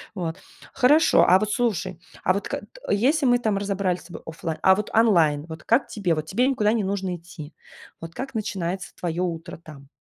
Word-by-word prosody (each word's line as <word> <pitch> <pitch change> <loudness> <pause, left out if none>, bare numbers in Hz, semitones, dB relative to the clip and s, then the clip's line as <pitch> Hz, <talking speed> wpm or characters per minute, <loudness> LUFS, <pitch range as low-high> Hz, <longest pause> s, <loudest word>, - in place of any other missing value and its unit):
Вот 165 -3 -4 0.3
хорошо, 295 +5 +5
а 185 +2 +6
вот 215 0 -1
слушай, 195 -7 -1 0.2
а 185 - +3
вот 200 - -3
к - - -20
т - - -5
если 270 +7 +2
мы 245 0 +4
там 215 -4 0
разобрали 195 -2 -1
с - - -15
тобой 170 - -10
оффлайн, 160 0 -5
а 190 0 +6
вот 210 - -4
онлайн, 165 -10 +3
вот 160 0 -9
как 235 +4 +2
тебе, 185 -6 -1
вот 155 0 -4
тебе 245 +9 +1
никуда 220 -6 +2
не 220 -4 0
нужно 190 -2 -2
идти, 165 -3 -11 0.5
вот 165 0 -9
как 265 -1 -6
начинается 190 -4 -4
твоё 175 +1 -2
утро 165 -1 -5
там? 150 -4 -14
190 Hz, 205 wpm, -24 LUFS, 170-220 Hz, 0.5 s, а